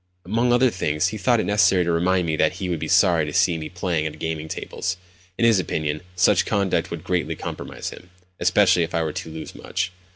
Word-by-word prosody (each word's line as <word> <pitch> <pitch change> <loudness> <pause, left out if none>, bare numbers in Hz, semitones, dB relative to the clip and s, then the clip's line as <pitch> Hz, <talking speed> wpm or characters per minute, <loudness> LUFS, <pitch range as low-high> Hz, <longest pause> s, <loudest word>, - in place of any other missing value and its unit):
Among 115 +6 +1
other 125 0 +4
things, 80 -1 0
he 110 - -5
thought 120 +4 +3
it - - 0
necessary 100 -3 +3
to 85 - 0
remind 90 +2 +2
me 80 -1 0
that - - +2
he 95 - -4
would 85 -3 -1
be - - -4
sorry 85 -3 +4
to 75 - -4
see 85 +2 +2
me 80 - -6
playing 85 -3 -1
at 75 - -6
the - - -13
gaming 80 -1 -4
tables. 90 +3 -4 0.4
In 115 - +2
his 115 -4 +5
opinion, 75 -3 -2
such 90 - +4
conduct 100 -5 0
would 85 -1 -6
greatly 90 -2 -1
compromise - - -6
him—especially 90 +1 0
if 80 - -2
I 85 - +1
were 80 -2 -3
to - - -6
lose 80 0 -8
much. - - -3
90 Hz, 225 wpm, -23 LUFS, 80-95 Hz, 0.4 s, his